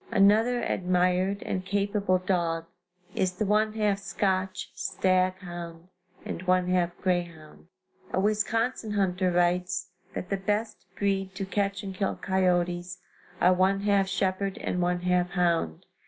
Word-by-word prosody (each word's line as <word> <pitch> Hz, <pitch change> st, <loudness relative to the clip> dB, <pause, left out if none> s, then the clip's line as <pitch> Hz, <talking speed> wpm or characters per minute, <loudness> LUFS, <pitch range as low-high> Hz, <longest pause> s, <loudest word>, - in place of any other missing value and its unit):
Another 225 Hz, +3 st, +4 dB
admired 185 Hz, +2 st, +1 dB
and 185 Hz, -, -2 dB
capable 200 Hz, -1 st, +1 dB
dog 170 Hz, -3 st, -1 dB, 0.5 s
is 185 Hz, -1 st, 0 dB
the 200 Hz, +4 st, -2 dB
one 215 Hz, +1 st, +2 dB
half 210 Hz, -2 st, +1 dB
Scotch 190 Hz, -1 st, -1 dB
stag 185 Hz, 0 st, +1 dB
hound 175 Hz, -1 st, -8 dB, 0.4 s
and -, -, -4 dB
one 180 Hz, 0 st, +3 dB
half 175 Hz, -1 st, +1 dB
grey 180 Hz, -1 st, +2 dB
hound. 160 Hz, -1 st, -14 dB, 0.4 s
A -, -, 0 dB
Wisconsin 215 Hz, +2 st, 0 dB
hunter 185 Hz, -2 st, +1 dB
writes 180 Hz, +1 st, +1 dB, 0.2 s
that 180 Hz, -, -4 dB
the 195 Hz, -, +1 dB
best 210 Hz, +3 st, -2 dB
breed 195 Hz, -1 st, -1 dB
to 195 Hz, 0 st, -3 dB
catch 195 Hz, 0 st, -1 dB
and 195 Hz, -1 st, -5 dB
kill 195 Hz, +1 st, -1 dB
coyotes 180 Hz, -1 st, 0 dB, 0.4 s
are 180 Hz, +1 st, +5 dB
one 190 Hz, +2 st, +2 dB
half 200 Hz, -1 st, +2 dB
shepherd 190 Hz, 0 st, -1 dB
and 180 Hz, -, -2 dB
one 175 Hz, 0 st, 0 dB
half 180 Hz, 0 st, +1 dB
hound. 170 Hz, -, 0 dB
185 Hz, 140 wpm, -27 LUFS, 180-200 Hz, 0.5 s, are